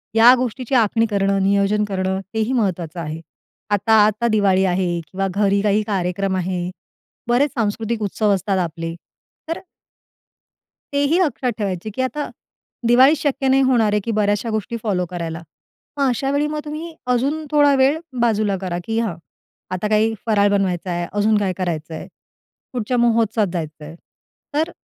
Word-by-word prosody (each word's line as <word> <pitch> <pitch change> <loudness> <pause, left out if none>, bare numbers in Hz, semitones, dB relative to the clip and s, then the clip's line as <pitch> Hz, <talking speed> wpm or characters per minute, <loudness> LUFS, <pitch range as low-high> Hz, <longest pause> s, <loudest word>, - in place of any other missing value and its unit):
या 230 +2 +8
गोष्टीची 255 +1 -2
आखणी 225 -1 +3
करणं, 195 -1 +1
नियोजन 200 +2 +2
करणं, 190 -1 -1
तेही 220 +3 0
महत्त्वाचं 180 -8 -1
आहे. 160 0 -5 0.5
आता 205 +2 +2
आता 215 +2 +1
दिवाळी 200 -4 +3
आहे 175 -1 0
किंवा 195 +1 -2
घरी 200 -1 +2
काही 210 0 +2
कार्यक्रम 195 -1 -1
आहे, 180 -1 -2 0.6
बरेच 250 +5 +2
सांस्कृतिक 225 0 -1
उत्सव 205 +1 +1
असतात 195 +1 -1
आपले. 165 -1 -3 0.5
तर 330 - -2 1.3
तेही 285 +5 +2
लक्षात 285 -8 0
ठेवायची 195 -2 -3
की - - -1
आता, 290 +3 -2 0.6
दिवाळीत 260 +5 +6
शक्य 275 -1 -1
नाही 265 +1 +4
होणार 235 -5 +3
आहे 210 - +3
की 230 - -1
बऱ्याचशा 210 +1 0
गोष्टी 220 +2 -2
फॉलो 190 -5 0
करायला. 170 -2 -5 0.6
मग 280 -1 +2
अशावेळी 275 +4 0
मग 300 0 -3
तुम्ही 310 +3 -6
अजून 275 +6 0
थोडा 290 -1 +5
वेळ 270 +4 +3 0.2
बाजूला 215 -4 +1
करा 180 -2 -3
की 225 0 -1
हां 220 -7 -1 0.6
आता 185 +3 -1
काही 215 +1 +3
फराळ 205 -3 +3
बनवायचा 185 -3 0
आहे, 175 0 -2
अजून 210 +1 +2
काय 200 -3 0
करायचंय, 165 -3 -4 0.7
कुठच्या 245 0 -1
महोत्सवात 230 -2 +2
जायचंय. 155 -2 -6 0.6
तर, 315 +4 0
210 Hz, 150 wpm, -20 LUFS, 190-245 Hz, 1.3 s, या